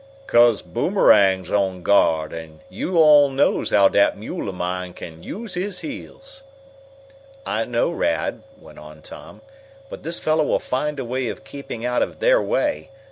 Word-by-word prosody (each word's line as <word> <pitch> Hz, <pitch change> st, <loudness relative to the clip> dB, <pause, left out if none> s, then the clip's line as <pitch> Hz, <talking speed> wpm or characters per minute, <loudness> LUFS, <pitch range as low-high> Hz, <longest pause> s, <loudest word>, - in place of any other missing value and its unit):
"'Cause 120 Hz, -, +4 dB
Boomerang's 95 Hz, -2 st, +2 dB
on 95 Hz, -3 st, -1 dB
guard, 80 Hz, -6 st, +2 dB
an' 80 Hz, -1 st, -10 dB
yo' 170 Hz, -, -4 dB
all 150 Hz, -3 st, +6 dB
knows 135 Hz, +1 st, +1 dB
how 100 Hz, -1 st, +5 dB
dat 100 Hz, -, +2 dB
mule 105 Hz, -1 st, -5 dB
of 95 Hz, -, -7 dB
mine 90 Hz, 0 st, -4 dB
can 80 Hz, -1 st, -10 dB
use 215 Hz, -, -7 dB
his 180 Hz, 0 st, -3 dB
heels!" 270 Hz, -, -9 dB, 1.0 s
"I 115 Hz, +1 st, -1 dB
know, 120 Hz, -1 st, 0 dB
Rad," -, -, -2 dB, 0.2 s
went -, -, -15 dB
on 75 Hz, 0 st, -14 dB
Tom; -, -, -13 dB, 0.5 s
"but -, -, -8 dB
this 170 Hz, +1 st, -4 dB
fellow 155 Hz, 0 st, +1 dB
will -, -, +1 dB
find 145 Hz, +3 st, -3 dB
a 130 Hz, -, -4 dB
way 125 Hz, +1 st, -2 dB
of -, -, -6 dB
keeping 135 Hz, -4 st, -8 dB
out 125 Hz, 0 st, 0 dB
of -, -, -2 dB
their -, -, +3 dB
way. 300 Hz, -, -1 dB
120 Hz, 165 wpm, -21 LUFS, -, 1.0 s, all